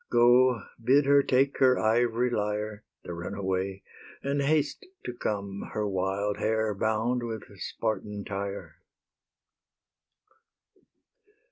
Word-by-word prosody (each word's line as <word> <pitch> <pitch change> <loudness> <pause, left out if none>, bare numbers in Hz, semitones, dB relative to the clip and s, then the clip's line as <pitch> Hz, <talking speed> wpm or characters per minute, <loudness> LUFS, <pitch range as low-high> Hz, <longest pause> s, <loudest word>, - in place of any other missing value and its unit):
Go, 120 0 +5 0.2
bid 135 +4 +5
her 140 0 +6
take 135 +1 +2
her 130 -1 +5
ivory 120 +2 +2
lyre, 105 -1 -2 0.2
The 85 - -6
runaway, 95 +2 -3 0.4
and 140 +1 0
haste 150 - 0 0.2
to 125 - -3
come, 100 -4 -4
Her 105 -1 -1
wild 100 +2 -1
hair 110 -1 0
bound 110 +4 0
with 115 -2 -4
Spartan 105 0 -3
tire. 100 0 -5
110 Hz, 105 wpm, -28 LUFS, 100-125 Hz, 0.4 s, her